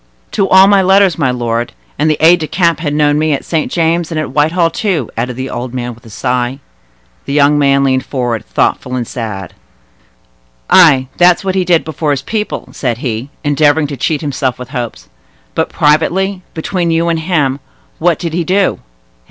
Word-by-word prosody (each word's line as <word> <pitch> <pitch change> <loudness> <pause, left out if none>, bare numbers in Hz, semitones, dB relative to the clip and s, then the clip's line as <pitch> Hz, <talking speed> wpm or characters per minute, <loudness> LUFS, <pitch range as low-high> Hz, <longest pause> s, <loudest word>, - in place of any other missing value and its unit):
"To 195 - 0
all 190 +1 +7
my 200 0 +4
letters, 190 -2 +3
my 140 -5 +2
lord; 120 -1 -2 0.3
and 155 - +2
the 155 - +1
aide 170 +3 +6
de 155 -2 -4
camp 170 -3 +1
had 150 -2 -2
known 150 0 +2
me 155 -1 +1
at 140 - -3
St. 160 -3 -1
James's 165 0 0
and 160 - -2
at 155 - -4
Whitehall, 165 +4 +2
too," 170 - -2
added 120 +2 -3
the 130 +1 -4
old 125 +1 -5
man 120 -1 -4
with 115 0 -17
a - - -12
sigh. 125 +3 -2 0.7
The 140 - -4
young 145 0 +4
man 140 -1 +3
leaned 130 -1 +1
forward, 120 -5 -3
thoughtful 125 - -1
and 120 -2 -3
sad. 105 -6 -6 1.2
"Ay, 150 -8 +6
that's 175 +2 +4
what 190 - 0
he 190 -1 +1
did 175 -2 +2
before 155 0 -3
his 140 -2 0
people," 215 +5 -4
said 120 -4 -2
he, 120 +1 -4
endeavoring 145 +1 +2
to 145 -1 -5
cheat 150 +4 -1
himself 135 -4 -2
with 125 0 -9
hopes. 120 - -5 0.5
"But, - - -1
privately—between 175 +2 0
you 165 +1 +1
and 165 -1 0
him—what 160 +1 -2
did 170 -3 -4
he 170 +1 0
do? 190 +3 +1
150 Hz, 185 wpm, -14 LUFS, 130-170 Hz, 1.2 s, all